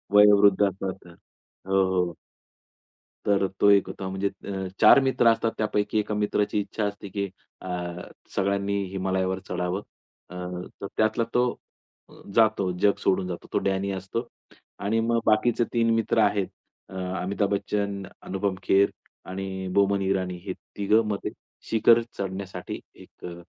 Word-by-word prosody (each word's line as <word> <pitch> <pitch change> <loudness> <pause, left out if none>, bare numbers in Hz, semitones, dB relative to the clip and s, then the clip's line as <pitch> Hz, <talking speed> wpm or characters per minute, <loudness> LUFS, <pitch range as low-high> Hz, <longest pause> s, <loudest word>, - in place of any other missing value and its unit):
वयोवृद्ध 105 -1 +7
असतात 95 -1 -5 0.6
हो, 95 0 +3
हो. 90 -3 0 1.1
तर 100 -1 +3
तो 100 - +6
एक 100 -1 +5
होता 95 - -5
म्हणजे 95 +1 -1 0.2
अ, 95 -1 -3
4 - - +8
मित्र 130 -3 +3
असतात 115 0 -1
त्यापैकी 105 0 0
1 105 0 -1
मित्राची 105 0 0
इच्छा 105 +1 -3
असते 100 0 -4
की 100 0 -2 0.3
अ, 95 - -8 0.7
सगळ्यांनी 100 +1 0
हिमालयावर 95 0 0
चढावं. 90 +2 -2 0.5
अ, 90 - -9 0.5
तर 100 - -4
त्यातला 110 +1 +2
तो 125 - +4 0.9
जातो 110 -4 +3
जग 100 +2 +4
सोडून 95 -1 +1
जातो 85 - -6
तो - - +3
डॅनी 95 0 0
असतो 95 +6 -4 0.5
आणि 105 +3 0
मग 115 0 +1
बाकीचे 115 +2 +3
3 115 -1 +2
मित्र 115 0 +1
आहेत 100 -2 +2 0.4
अ, 95 - -12 0.3
अमिताभ 100 +2 0
बच्चन, 100 0 -1 0.2
अनुपम 95 0 -1
खेर 100 +1 +4 0.4
आणि 95 0 -4
बोमन 100 0 +3
इराणी 95 -2 0
हे - - -3 0.2
3घं 105 +2 +3
मग 105 - 0
ते - - -1 0.4
शिखर 115 +1 +5 0.2
चढण्यासाठी 95 -1 -5
एक - - -17
अ, 85 0 -8
100 Hz, 145 wpm, -26 LUFS, 95-105 Hz, 1.1 s, 4